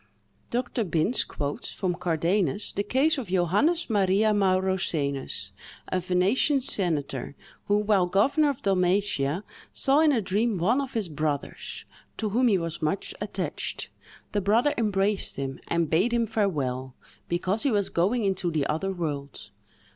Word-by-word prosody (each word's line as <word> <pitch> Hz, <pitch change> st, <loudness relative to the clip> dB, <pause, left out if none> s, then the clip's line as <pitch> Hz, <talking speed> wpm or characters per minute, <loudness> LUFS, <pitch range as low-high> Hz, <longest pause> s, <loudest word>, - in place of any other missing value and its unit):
Dr. 245 Hz, -1 st, -1 dB
Binns 175 Hz, +6 st, +1 dB
quotes, 145 Hz, -1 st, -4 dB
from 185 Hz, -2 st, -1 dB
Cardanus, 175 Hz, +2 st, +1 dB
the 200 Hz, -, -1 dB
case 270 Hz, +9 st, +2 dB
of 240 Hz, -, -6 dB
Johannes 195 Hz, -, +2 dB
Maria 205 Hz, 0 st, +3 dB
Maurosenus, 180 Hz, -, 0 dB, 0.4 s
a 185 Hz, -, 0 dB
Venetian 185 Hz, -, +2 dB
senator, 150 Hz, -, -2 dB, 0.3 s
who, 205 Hz, -, +2 dB
while 205 Hz, -3 st, +2 dB
governor 275 Hz, -, +3 dB
of 275 Hz, -, -4 dB
Dalmatia, 185 Hz, -4 st, +1 dB, 0.3 s
saw 275 Hz, +2 st, +3 dB
in 315 Hz, -1 st, +5 dB
a 255 Hz, -, +2 dB
dream 210 Hz, +2 st, 0 dB
one 225 Hz, +11 st, +2 dB
of 270 Hz, -2 st, -6 dB
his 220 Hz, -5 st, -1 dB
brothers, 150 Hz, -2 st, -4 dB, 0.3 s
to 215 Hz, -, -1 dB
whom 245 Hz, +5 st, +2 dB
he 205 Hz, -4 st, +4 dB
was 165 Hz, -1 st, -4 dB
much 155 Hz, +5 st, -1 dB
attached: -, -, -3 dB, 0.4 s
the 205 Hz, -, 0 dB
brother 225 Hz, +9 st, +3 dB
embraced 205 Hz, -2 st, +1 dB
him 135 Hz, -1 st, -4 dB
and 170 Hz, -1 st, +1 dB
bade 190 Hz, +9 st, +2 dB
him 235 Hz, -1 st, +2 dB
farewell, 140 Hz, -, -1 dB, 0.3 s
because 185 Hz, +5 st, 0 dB
he 285 Hz, -, +2 dB
was 205 Hz, -4 st, +1 dB
going 210 Hz, +8 st, +1 dB
into 190 Hz, -3 st, 0 dB
the 155 Hz, -4 st, 0 dB
other 160 Hz, +7 st, -1 dB
world. 145 Hz, -, -5 dB
195 Hz, 145 wpm, -26 LUFS, 165-220 Hz, 0.4 s, in